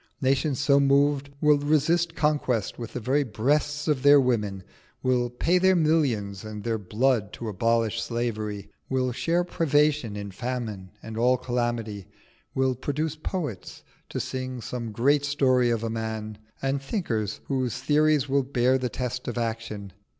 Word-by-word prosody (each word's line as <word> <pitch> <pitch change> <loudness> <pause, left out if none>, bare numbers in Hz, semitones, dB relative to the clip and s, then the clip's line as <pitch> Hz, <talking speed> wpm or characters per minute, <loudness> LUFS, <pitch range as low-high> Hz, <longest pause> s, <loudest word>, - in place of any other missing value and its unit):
Nations 135 +1 +1
so 140 -1 +4
moved 140 0 +3
will 150 -1 +5
resist 160 +3 +2
conquest 145 -10 0
with 115 -2 -6
the - - -3
very 135 +5 +1
breasts 145 +6 0
of 145 -4 +1
their 145 +1 +7
women, 105 -7 0 0.4
will 125 -1 +2
pay 165 +9 +1
their 190 +1 +4
millions 130 - +1
and 105 -1 -7
their 115 -1 -1
blood 110 +1 +1
to 115 - -6
abolish 115 +2 +1
slavery, 110 -3 -3 0.2
will 130 -1 0
share 170 +8 +1
privation 150 - +1
in 100 -1 -6
famine 110 -4 -4
and 110 0 -7
all 125 +2 +4
calamity, 120 -5 -2 0.5
will 130 -1 +2
produce 150 +4 -2
poets 155 - -5 0.3
to - - -3
sing 130 -1 -4
"some 115 0 -5
great 140 +7 +2
story 130 -4 +2
of 115 -1 0
a 115 - -1
man," 110 -1 -4 0.2
and 135 +1 0
thinkers 115 - -2
whose 130 -3 -1
theories 150 +1 +2
will 140 +1 +2
bear 130 -1 +2
the 125 -1 -1
test 125 +1 -4
of 120 - -3
action. 110 -4 -4
125 Hz, 155 wpm, -26 LUFS, 115-145 Hz, 0.5 s, their